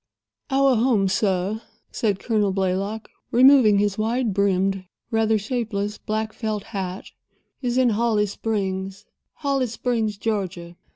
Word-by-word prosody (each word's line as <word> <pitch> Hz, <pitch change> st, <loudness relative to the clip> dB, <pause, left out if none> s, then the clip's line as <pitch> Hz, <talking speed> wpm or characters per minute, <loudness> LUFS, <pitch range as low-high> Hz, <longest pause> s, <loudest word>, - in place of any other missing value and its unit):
"Our 270 Hz, -2 st, +3 dB
home, 225 Hz, -4 st, +3 dB
sir," 190 Hz, +2 st, 0 dB, 0.3 s
said 205 Hz, -4 st, 0 dB
Colonel 210 Hz, -1 st, 0 dB
Blaylock, 195 Hz, +3 st, -2 dB, 0.2 s
removing 250 Hz, -4 st, +6 dB
his 205 Hz, 0 st, 0 dB
wide 230 Hz, 0 st, 0 dB
brimmed, 195 Hz, -1 st, +1 dB, 0.3 s
rather 220 Hz, -1 st, +2 dB
shapeless 210 Hz, -2 st, -3 dB
black 215 Hz, 0 st, -3 dB
felt 215 Hz, -3 st, -3 dB
hat, 190 Hz, -3 st, -5 dB, 0.5 s
"is 245 Hz, -1 st, -1 dB
in 255 Hz, -2 st, +4 dB
Holly 220 Hz, -1 st, +2 dB
Springs—Holly 205 Hz, +7 st, -3 dB
Springs, 225 Hz, -2 st, -1 dB
Georgia. 185 Hz, -5 st, -3 dB
215 Hz, 115 wpm, -23 LUFS, 195-230 Hz, 0.5 s, removing